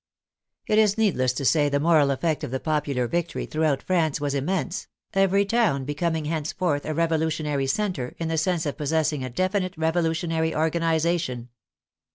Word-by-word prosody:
It 215 - +3
is 210 -1 +3
needless 180 - +2
to 135 +2 -3
say 145 +1 +3
the 140 0 +1
moral 155 -2 +4
effect 145 +3 -1
of - - -3
the 130 +2 -2
popular 145 -5 -1
victory 170 +3 -2
throughout 155 -3 0
France 165 -5 +1
was 145 -1 -1
immense, 180 +6 -2 0.3
every 195 +1 +3
town 200 - +1
becoming 160 +2 -1
henceforth 155 0 -1
a 155 - -2
revolutionary 155 -3 0
center 165 -6 -2
in 165 - -3
the 165 - -1
sense 170 0 0
of 145 - -3
possessing 150 -1 0
a 130 - -4
definite 185 - -1
revolutionary 160 0 0
organization. 160 -5 0
160 Hz, 160 wpm, -25 LUFS, 145-175 Hz, 0.3 s, moral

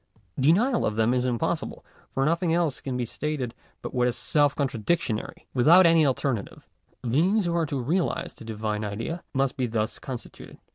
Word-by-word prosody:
Denial 205 - +3
of 105 - 0
them 110 +2 +2
is 125 0 +1
impossible, 120 -3 -2 0.3
for 135 - 0
nothing 170 +2 +1
else 165 -4 0
can 130 -2 -3
be 125 - -1
stated 135 -1 -3 0.3
but - - -5
what 125 -1 +2
is 125 - -1
self 145 -2 +2
contradictory. 130 -2 -2
Without 165 +9 +6
any 165 -3 +5
alternative, 130 -5 -2 0.4
beings 180 - +2
who 170 - 0
are 170 -2 +1
to 140 -2 -2
realize 165 +9 -1
the - - -13
Divine 110 -1 -3
Idea 115 +12 -4
must 135 +1 +1
be 130 -2 0
thus 110 -1 -2
constituted. 125 -4 -8
135 Hz, 175 wpm, -26 LUFS, 115-165 Hz, 0.4 s, Without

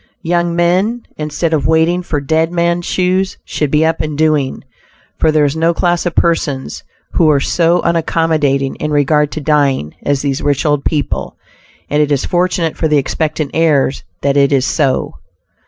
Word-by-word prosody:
Young 170 0 0
men, 185 +8 +1
instead 155 +2 -2
of 150 - +1
"waiting 160 +3 +2
for 160 -4 -3
dead 160 +4 0
men's 170 0 0
shoes," 185 +1 0
should 150 - -2
be 150 +3 +2
up 165 0 0
and 150 -2 -4
doing, 155 -4 0 0.6
for 160 - +3
there 155 -1 +3
is 140 +1 -1
no 165 +1 +1
class 175 0 0
of 175 - -4
persons 150 -5 -1 0.3
who 165 -3 +3
are 145 -2 +3
so 170 +4 +1
unaccommodating 160 -5 0
in 150 - -3
regard 150 0 +2
to - - -4
dying 140 - +1
as 140 -1 -1
these 140 -2 -1
rich 145 0 0
old 145 -2 +1
people, 150 -3 -2 0.5
and 150 +1 +1
it 150 -1 0
is 140 -2 +1
fortunate 175 -2 0
for 160 - 0
the 150 -1 +2
expectant 155 +1 -2
heirs 150 -4 +1 0.2
that 140 0 +1
it 140 0 +3
is 135 -2 +2
so. 135 -5 0
155 Hz, 175 wpm, -15 LUFS, 145-170 Hz, 0.6 s, for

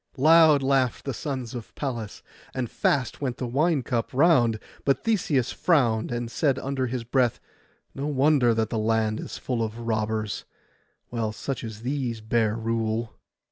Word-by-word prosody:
Loud 155 0 +6
laughed 130 -3 +1
the 135 - -2
sons 130 -3 -4
of 120 -3 -8
Pallas, 120 -7 -5 0.3
and 125 -3 -2
fast 130 -2 0
went 130 -4 -2
the 125 - -3
wine 145 +4 +1
cup 115 -1 -1
round; 130 -6 +4 0.3
but 140 - +1
Theseus 165 - +1
frowned, 120 -11 +2
and 120 -1 -3
said 135 +2 +1
under 135 -1 -2
his 120 0 -3
breath, 120 0 +1 0.5
'No 140 +2 -3
wonder 140 -4 +3
that 110 -1 0
the 115 - 0
land 110 0 +1
is - - -6
full 125 -3 -2
of 110 0 -3
robbers, 110 -2 -2 0.7
while 115 -3 -2
such 125 +5 -5
as 110 -1 -7
these 125 -3 -2
bear 110 0 +1
rule. 115 0 -2
120 Hz, 160 wpm, -26 LUFS, 115-135 Hz, 0.7 s, Loud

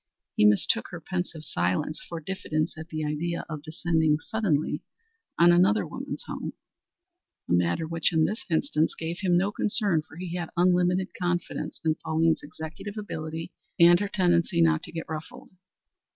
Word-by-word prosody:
He 105 - +4
mistook 105 - +3
her 175 - -7
pensive 175 -2 -4
silence 90 - -1
for 170 - -4
diffidence 155 -2 -2
at 160 +1 -8
the 155 -1 -3
idea 165 +3 -2
of 155 -3 -5
descending 160 0 +1
suddenly 180 -8 0 0.6
on 170 +1 +7
another 185 +5 +4
woman's - - -6
home - - -5 0.9
a - - 0
matter 85 - +2
which 165 +1 +1
in 160 -2 +3
this 215 +6 -2
instance 160 - +1
gave 165 +1 -4
him 180 -3 +3
no 195 +3 +1
concern, 205 -6 +1
for 160 +1 -15
he 175 -1 -5
had 175 -2 -3
unlimited 180 +1 +3
confidence 175 0 -2
in 155 -1 +2
Pauline's 160 0 +2
executive 160 +7 -8
ability 165 -4 -5 0.3
and 175 +1 +8
her 205 - -2
tendency 175 -3 +2
not 165 -1 +4
to - - -10
get 165 -1 -5
ruffled. 245 - -7
170 Hz, 160 wpm, -27 LUFS, 155-180 Hz, 0.9 s, and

